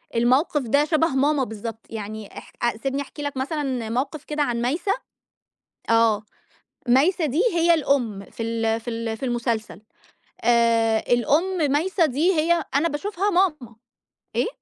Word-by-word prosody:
الموقف 260 +6 +2
ده 280 +4 +2
شبه 320 +1 +2
ماما 280 0 +1
بالضبط. 220 0 -7
يعني 215 -1 -7
اح - - -11 0.3
سيبني 275 +1 -1
أحكي 295 +2 -9
لك 285 -2 -4
مثلًا 265 -5 -2
موقف 275 +5 -2
كده 300 -1 -1
عن 235 -3 -1
مايسة. 320 +11 0 1.0
آه. 225 -2 +3 0.7
مايسة 310 +7 +3
دي 300 - +1
هي 340 0 +4
الأم 250 -10 0
في 230 - -6
ال 225 0 -1
في 240 +1 -6
ال 225 -1 -3
في 245 - -6
المسلسل. 230 -6 -2 0.6
آآ 230 -1 +3
الأم 295 - +2
مايسة 340 +4 +2
دي 310 +7 +2
هي 335 +1 +2
أنا 315 +4 +3
باشوفها 395 +6 -2
ماما. 305 - 0 0.6
إيه؟ - - +2
270 Hz, 145 wpm, -23 LUFS, 230-310 Hz, 1.0 s, هي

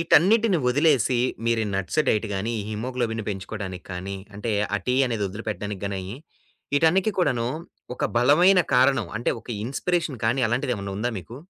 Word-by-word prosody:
ఈటన్నిటిని 195 +5 +4
వదిలేసి, 130 -3 +3 0.3
మీరు 115 -1 +2
nuts 95 +10 0
diet 110 +1 +2
గాని, 110 +5 -2
హిమోగ్లోబిన్‌ని 115 0 -3
పెంచుకోవడానికి 95 -1 -6
కాని, 95 +2 -5 0.2
అంటే 110 +2 -2 0.2
ఆ - - -2
టీ, 125 - +2
అనేదొదిలిపెట్టడానికి 105 -2 -4
గాని, 95 -1 -3 0.7
ఈటన్నిటి 180 +7 +3
కూడాను, 120 -9 +1 0.5
ఒక - - -1
బలమైన 175 +10 +5
కారణం 130 -2 +4
అంటే 120 - 0
ఒక - - -23 0.2
ఇన్‌స్పిరేషన్ 155 +1 -1
కాని, 120 +4 +2
అలాంటిదేమైనా 120 -5 -2
ఉందా 120 +4 -1
మీకు? 115 +7 -10
120 Hz, 135 wpm, -24 LUFS, 105-145 Hz, 0.7 s, బలమైన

